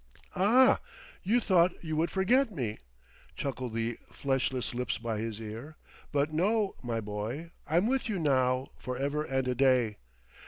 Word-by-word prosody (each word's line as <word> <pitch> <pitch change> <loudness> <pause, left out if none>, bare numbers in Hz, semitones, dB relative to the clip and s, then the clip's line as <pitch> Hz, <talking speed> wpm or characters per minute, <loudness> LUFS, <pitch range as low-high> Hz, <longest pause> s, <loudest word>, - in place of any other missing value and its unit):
"Ah, 235 +8 +5 0.4
you 220 +6 +3
thought 180 -6 +3
you 155 -2 -2
would 160 +2 +1
forget 235 +8 +3
me?" 120 - -3 0.6
chuckled 125 -4 -4
the 115 +1 -2
fleshless 130 -2 -1
lips 125 0 -2
by 115 -2 -3
his 110 -1 -4
ear. 115 +8 -7 0.4
"But 145 +1 +1
no, 200 +5 +2
my 120 -2 -2
boy; 110 +10 -5 0.2
I'm 170 +5 +3
with 260 0 0
you 205 - 0
now, 130 -4 +2
for 125 0 -4
ever 140 +3 -1
and 130 -3 -1
a 125 - +1
day. 125 -4 +3
135 Hz, 155 wpm, -30 LUFS, 120-175 Hz, 0.6 s, Ah